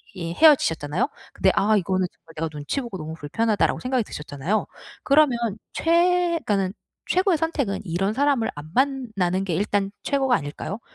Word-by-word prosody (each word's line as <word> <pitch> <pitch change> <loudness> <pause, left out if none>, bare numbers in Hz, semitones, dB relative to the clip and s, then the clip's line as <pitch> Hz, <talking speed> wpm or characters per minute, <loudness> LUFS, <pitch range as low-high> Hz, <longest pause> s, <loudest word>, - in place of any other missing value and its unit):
이 170 -2 -4
헤어지셨잖아요. 165 - +3 0.2
근데 190 - +3
'아 215 +2 +3
이거는 185 -1 0
정말 165 -1 -19
내가 165 - -1
눈치 150 - -3
보고 235 -6 -6
너무 160 -1 -6
불편하다.'라고 210 +8 0
생각이 255 -1 0
드셨잖아요. 150 +8 -3 0.4
그러면 280 -3 +4 0.4
최 350 +1 +3 0.2
그러니까는 195 -2 0 0.4
최고의 370 -2 +3
선택은 280 -12 -1
이런 190 +4 -1
사람을 275 -3 +1
안 145 +1 -9
만나는 220 -9 0
게 175 -4 -1
일단 200 +1 0
최고가 270 -3 +2
아닐까요? 145 +9 -4
205 Hz, 395 characters per minute, -24 LUFS, 170-275 Hz, 0.4 s, 그러면